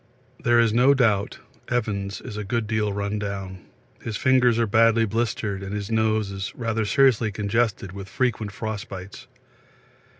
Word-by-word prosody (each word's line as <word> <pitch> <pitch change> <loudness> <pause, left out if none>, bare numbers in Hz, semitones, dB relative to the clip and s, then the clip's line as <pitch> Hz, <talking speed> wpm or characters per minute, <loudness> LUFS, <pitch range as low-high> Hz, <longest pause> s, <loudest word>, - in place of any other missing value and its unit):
There 120 0 +4
is 115 -2 +3
no 130 +4 +5
doubt 110 -6 +1 0.3
Evans 100 -5 -2
is - - -8
a 105 - -4
good 115 +3 -1
deal 105 -1 0
run 100 +1 -2
down 95 -2 -5 0.4
his 115 -2 -4
fingers 125 -3 +3
are 115 - +2
badly 115 +1 +4
blistered 105 -2 -2
and 100 +1 -5
his 100 +1 -4
nose 110 -2 +1
is 95 0 -5
rather 115 -2 -1
seriously 120 -2 +3
congested 105 -1 -1
with 100 0 -8
frequent 110 -3 -1
frost 110 0 -5
bites. 95 +4 -9
110 Hz, 160 wpm, -24 LUFS, 100-115 Hz, 0.4 s, no